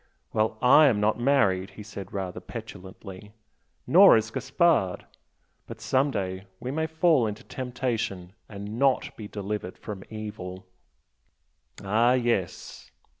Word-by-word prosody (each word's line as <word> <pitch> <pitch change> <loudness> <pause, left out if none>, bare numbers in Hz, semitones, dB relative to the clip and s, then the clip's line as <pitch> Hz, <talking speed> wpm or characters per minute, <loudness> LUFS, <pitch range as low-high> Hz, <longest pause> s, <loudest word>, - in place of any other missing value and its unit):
"Well, 110 0 0
I 145 +5 +7
am 115 -6 +2
not 105 +3 +1
married" 100 -8 +2
he 105 - -7
said, 100 -3 -9
rather 95 -2 -4
petulantly 100 -1 -10 0.5
"Nor - - +8
is 110 +1 -2
Gaspard. 135 - +1 0.6
But - - -9
some 135 +2 +1
day 95 -4 -4
we 125 - -5
may 160 +2 -1
fall 160 -6 +3
into 105 0 -6
temptation 120 -8 -4 0.2
and 105 +2 -7
NOT 135 -1 +1
be 105 - -8
delivered 100 -2 -5
from 100 -3 -8
evil." 105 -4 -7 1.2
"Ah 115 +5 +3
yes!" 120 -8 -2
110 Hz, 125 wpm, -26 LUFS, 95-125 Hz, 1.2 s, Nor